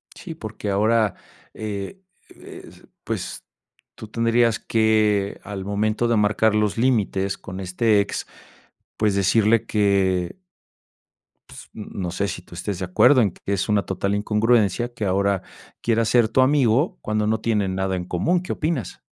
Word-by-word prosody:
Sí, 165 -3 -8
porque 110 -6 -6
ahora, 110 +1 +2 0.4
eh 105 - -6 0.4
eh, - - -12 0.3
pues, - - -5 0.5
tú 110 - -9
tendrías 115 0 +1
que, 110 -3 +1
al 100 -2 -6
momento 105 +3 0
de 115 - +2
marcar 105 +1 +2
los 105 0 0
límites 100 -6 +1
con 95 0 -9
este 100 +4 +1
ex, 100 - -3 0.7
pues, 105 -2 +1
decirle 105 +3 +3
que 100 - +1 1.1
pues, - - -12
no 95 -4 -6
sé, 100 +3 -2
si 90 - -5
tú 90 - -15
estés 95 +2 -4
de 95 - -3
acuerdo, 125 +9 +5
en 100 -5 +1
que 100 - -6
es 100 +2 -1
una 105 -1 +2
total 100 +1 -2
incongruencia, 110 +2 +1
que 110 - -4
ahora 100 0 +1 0.4
quiera 115 -1 +1
ser 115 0 +3
tu 130 - +2
amigo, 135 +4 +2
cuando 105 0 -1
no 110 +1 0
tienen 105 -5 0
nada 95 0 -1
en 90 - -4
común, 165 - 0
¿qué 180 - -4
opinas? 155 - -3
105 Hz, 155 wpm, -22 LUFS, 100-115 Hz, 1.1 s, acuerdo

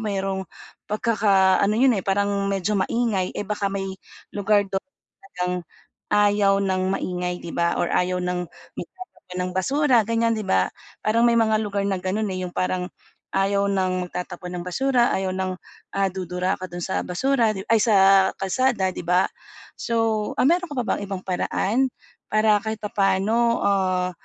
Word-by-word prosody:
merong 195 -2 -2 0.4
pagkaka-ano 205 -2 +3
'yon, 245 -3 +4
eh, - - -5
parang 200 0 +1
medyo 195 +1 0
maingay. 200 -2 0
Eh, - - -1
baka 205 -1 -1
may 195 -1 -3 0.4
lugar 205 0 +2
do'n 195 -1 -2 0.4
talagang 180 - -4 0.6
ayaw 205 -1 +4
ng 190 -1 0
maingay, 180 -1 -3
'di 170 - -7
ba? 170 0 +1
Or 175 - 0
ayaw 180 0 0
ng 180 0 -2 0.3
magtatapon 370 - -10
ng - - -4
basura 275 +7 +2
ganyan, 230 0 +1
'di 215 - -5
ba? 95 0 +2 0.3
Parang 230 +2 +3
may 235 - +4
mga 220 -1 +3
lugar 205 -1 -2
na 195 -2 0
gano'n, 200 +3 -1
eh, 185 0 -3
yung 175 - -10
parang 185 0 -1 0.5
ayaw 200 +1 +2
ng 185 -2 0
magtatapon 180 0 -6
ng 175 - -6
basura, 245 +5 +2
ayaw 190 -1 -1
ng, 185 0 -2 0.4
ah, 195 0 +2
dudura 180 0 -2
ka 185 - -5
do'n 175 -1 -7
sa 190 - -1
basura, 230 +3 +1
di 190 - -5
ay, 225 - +6
sa 195 -3 +5
kalsada, 195 0 0
'di 185 - -7
ba? 180 +1 +4 0.6
So, 225 -2 0
ah, - - +4
meron 355 +4 +3
ka 290 - -5
pa - - +2
bang - - -1
ibang 190 -1 -5
paraan, 210 +7 0 0.4
para 215 -1 +3
kahit 220 +1 -5
papa'no, 210 +4 +1
ah, 185 -2 +1
195 Hz, 165 wpm, -23 LUFS, 185-220 Hz, 0.6 s, ay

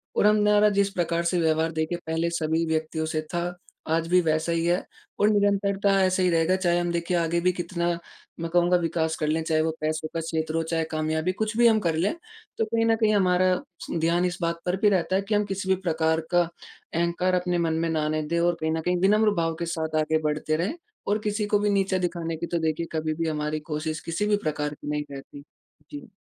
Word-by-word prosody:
और - - +3
हम 210 - +5
मेरा 210 0 +5
जिस 200 0 +2
प्रकार 170 -2 0
से 175 +1 +1
व्यवहार 160 0 +1
देखिए 160 +2 -2
पहले 165 +1 0
सभी 165 -1 0
व्यक्तियों 160 0 -1
से 155 0 -2
था 175 +1 -1 0.4
आज 165 0 0
भी 180 +2 +4
वैसा 160 +1 0
ही 165 0 0
है 175 +2 +1 0.4
और 205 - +4
निरंतरता 200 -1 +2
ऐसे 185 0 +2
ही 180 - +3
रहेगा 165 +2 +3
चाहे 175 -2 +1
हम 175 0 -1
देखिए 170 +1 -1
आगे 170 0 +1
भी 180 +1 +3
कितना 170 0 -2 0.5
मैं 165 0 -3
कहूँगा 175 +1 +4
विकास 160 -1 -1
कर 155 - 0
लें, 160 +2 +1
चाहे 160 -1 +1
वो 160 0 0
पैसों 155 0 -1
का 165 - -1
क्षेत्र 160 -1 -2
हो 165 - +2
चाहे 165 0 -1
कामयाबी 155 +2 0
कुछ 215 +2 -2
भी 240 0 +6
हम 220 -1 +4
कर 170 -5 0
लें। 170 - +1 0.4
तो 225 - +1
कहीं 225 +1 0
न 225 - +4
कहीं 220 -1 +2
हमारा 185 -1 +3 0.5
ध्यान 170 +2 +2
इस 180 -1 -2
बात 170 0 -1
पर 180 - +2
भी 210 - +5
रहता 185 -1 +1
है 195 - +2
कि 210 +2 -1
हम 205 0 +2
किसी 195 -1 -4
भी 190 - +5
प्रकार 160 -2 +1
का 175 0 +5 0.5
अहँकार 170 +2 0
अपने 180 -1 -1
मन 160 - 0
में 165 - 0
ना 155 -2 0
आने 155 0 0
दें 170 +1 0
और 175 0 +2
कहीं 160 0 0
न 160 0 -1
कहीं 180 +2 0
विनम्र 210 +2 +4
भाव 165 0 -1
के 170 - -1
साथ 160 -1 -3
आगे 155 +1 +1
बढ़ते 155 +1 0
रहें 180 - -1 0.3
और 210 +2 +1
किसी 210 0 -1
को 205 0 +2
भी 205 - +1
नीचा 195 -1 +1
दिखाने 165 -1 -4
की 170 - -3
तो 170 - -1
देखिए 160 +1 -1
कभी 155 -1 -1
भी 165 +1 -2
हमारी 150 0 -2
कोशिश 155 +1 -2
किसी 185 +6 -1
भी 210 - +3
प्रकार 150 -1 -2
की 145 - -11
नहीं 150 0 -1
रहती। 140 +1 -10 0.5
जी। 285 -4 -8
170 Hz, 235 wpm, -25 LUFS, 160-190 Hz, 0.5 s, भी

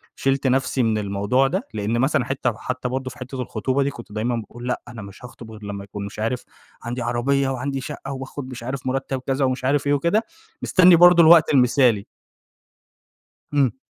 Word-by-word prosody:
شِلت 135 0 0
نفسي 130 0 +1
من 110 -1 +1
الموضوع 100 +6 +1
ده، 185 +8 -3
لأن 110 +2 -1
مثلًا 135 -1 +1
حتة 135 -1 -1
وحتى 125 +3 -4
برضو 130 +1 -3
في - - -13
حتة 130 0 -6
الخطوبة 130 +3 -1
دي 140 - 0
كنت 120 -5 -12
دايمًا 110 +3 -1
باقول 120 +2 -7
لأ 125 - -2
أنا 120 -2 -9
مش 100 +4 -11
هاخطب 115 -2 -12
غير 110 -1 -12
لمّا 100 -1 -6
يكون 100 0 -7
مش 100 - -9
عارف 115 +3 -2 0.4
عندي 120 +1 -4
عربية 130 +3 0
وعندي 135 +1 -3
شقة 140 -1 -7
وباخد 135 0 -7
مش 125 -2 -8
عارف 130 +1 -5
مرتب 135 0 -2
كذا 135 0 +1
ومش 130 0 -2
عارف 140 +1 +1
إيه 145 - +3
وكده، 170 +10 +1 0.4
مستني 180 -1 +6
برضو 175 0 +7
الوقت 160 -1 +6
المثالي. 125 -5 +3 1.5
امم. 130 -4 +1
130 Hz, 190 wpm, -22 LUFS, 115-135 Hz, 1.5 s, برضو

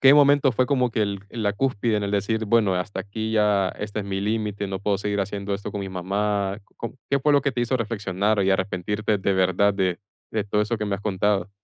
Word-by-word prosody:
¿qué 135 +1 +8
momento 145 -2 +5
fue 125 +3 +2
como 125 -3 +2
que 110 - +1
el 100 -1 -1
la 105 -3 -1
cúspide 115 -2 0
en 105 - -1
el 100 - -3
decir: 110 +2 0
"Bueno, 105 -3 +3
hasta 90 +3 -3
aquí, 110 +2 -4
ya 105 -3 +3
este 105 0 -4
es - - -5
mi 95 -1 -3
límite, 105 -1 -2
no 95 0 -3
puedo 100 0 0
seguir 100 0 -1
haciendo 100 0 -3
esto 100 - -6
con 100 - -3
mi 95 - -4
mamá?", 100 +2 -1
co - - -33
com 115 - -6 0.2
¿qué 140 - +3
fue 150 +2 +2
lo 145 - +5
que 140 - 0
te 125 - -3
hizo 125 +2 +1
reflexionar, 105 -2 0
y 95 - +2
arrepentirte 100 +3 0
de 100 +1 +1
verdad, 95 +2 +3
de 95 -3 0 0.3
de 110 -2 -1
todo 105 +1 +1
eso 115 +1 -2
que 105 - -2
me 100 - -1
has 100 - -6
contado? 100 0 0
105 Hz, 245 wpm, -24 LUFS, 100-110 Hz, 0.3 s, qué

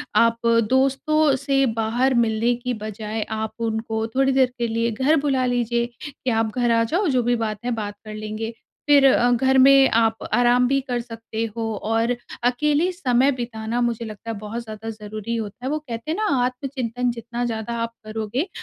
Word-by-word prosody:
आप 230 0 +4 0.3
दोस्तों 275 +3 +3
से 275 0 +1
बाहर 240 +4 +1
मिलने 225 +2 +1
की 245 +1 -3
बजाय 215 0 -5
आप 220 0 -3
उनको 220 -1 -2
थोड़ी 270 0 +3
देर 260 -1 +3
के 235 - 0
लिए 230 +1 0
घर 265 +8 +2
बुला 270 -3 +1
लीजिए, 240 -1 0 0.3
कि 260 -1 -5
आप 225 -1 0
घर 240 -1 +2
आ 230 0 +3
जाओ, 350 - 0
जो 255 -4 +2
भी 240 +1 +2
बात 220 -2 -2
है 245 - 0
बात 205 -1 -5
कर 215 - -7
लेंगे। 215 +1 -5 0.4
फिर 285 -1 +7
अ, 245 -2 +5
घर 265 +2 +3
में 270 0 +7
आप 225 -1 +3 0.2
आराम 245 +2 +4
भी 275 +2 +2
कर 250 -2 -2
सकते 225 -1 -6
हो 230 - -1 0.2
और 225 +2 +1 0.3
अकेले 300 +8 +2
समय 270 -6 +2
बिताना 235 -2 -3
मुझे 235 -1 -1
लगता 220 +1 -7
है, 225 - -5
बहुत 215 +3 -5
ज़्यादा 220 0 -7
ज़रूरी 215 +1 -5
होता 225 +2 -5
है। - - -1
वो 305 - 0
कहते 250 0 -6
हैं - - 0
ना, 430 - 0 0.2
आत्मचिंतन 250 -1 -2
जितना 235 +1 -5
ज़्यादा 225 0 -3
आप 230 0 -2
करोगे, 220 - -3
235 Hz, 190 wpm, -22 LUFS, 225-260 Hz, 0.4 s, फिर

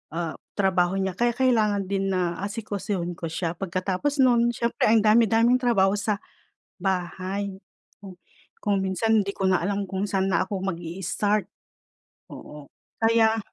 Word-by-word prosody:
ah, 170 -2 -3 0.2
trabaho 185 -2 +2
niya 190 0 0
kaya 240 0 +2
kailangan 220 -6 +2
din 195 0 0
na 175 -2 -1
asikasuhin 200 -4 -4
ko 165 - -3
siya. 165 +1 -2
Pagkatapos 190 - -1
no'n 235 -2 +4
siyempre, 235 -2 0
ang 220 -1 +4
dami-daming 230 +3 +4
trabaho 200 -6 +3
sa 205 0 -2 0.6
bahay 190 +1 -3 0.4
kung 195 -2 -11 0.5
kung 200 -2 +1
minsan 195 +4 +1
hindi 200 - -3
ko 190 -1 0
na 185 - +3
alam 200 +3 -1
kung 195 +1 -3
saan 195 -1 0
na 185 +1 +1
ako 190 -1 -4
mag-i-start, 190 +3 -2 0.8
oo. 150 -1 -10 0.3
Kaya 225 0 +3
195 Hz, 140 wpm, -25 LUFS, 185-220 Hz, 0.8 s, no'n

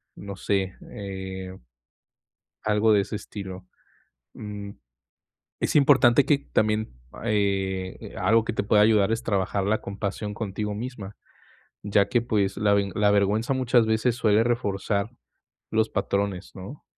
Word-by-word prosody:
no 100 0 -8
sé, 95 -1 -1 0.2
eh, 95 -1 -6 1.1
algo 105 +1 +3
de 105 - +5
ese 100 - -7
estilo. 95 -3 -8 0.7
Mm, 105 -2 -7 0.9
es - - 0
importante 135 -2 +6
que 145 0 +4 0.2
también, 110 -3 +1 0.2
ah, - - -11
eh, 95 -3 -1
algo 110 +5 +3
que 115 - -2
te 110 - -1
pueda 105 +1 +4
ayudar 105 -1 +4
es 115 - -1
trabajar 100 -1 0
la 110 +2 +1
compasión 100 +1 -4
contigo 105 -1 -3
misma, 105 -3 -7 0.7
ya 100 -1 +2
que, 120 -2 +2
pues, 105 -4 0
la 100 -1 +3
ve 100 -1 +1
la 105 0 +3
vergüenza 105 +5 +2
muchas 125 -2 +3
veces 110 +2 +1
suele 110 -3 +3
reforzar 105 -3 -1 0.6
los 110 0 +2
patrones, 100 -2 -2
¿no?, 100 +10 -10
105 Hz, 140 wpm, -25 LUFS, 100-110 Hz, 1.1 s, importante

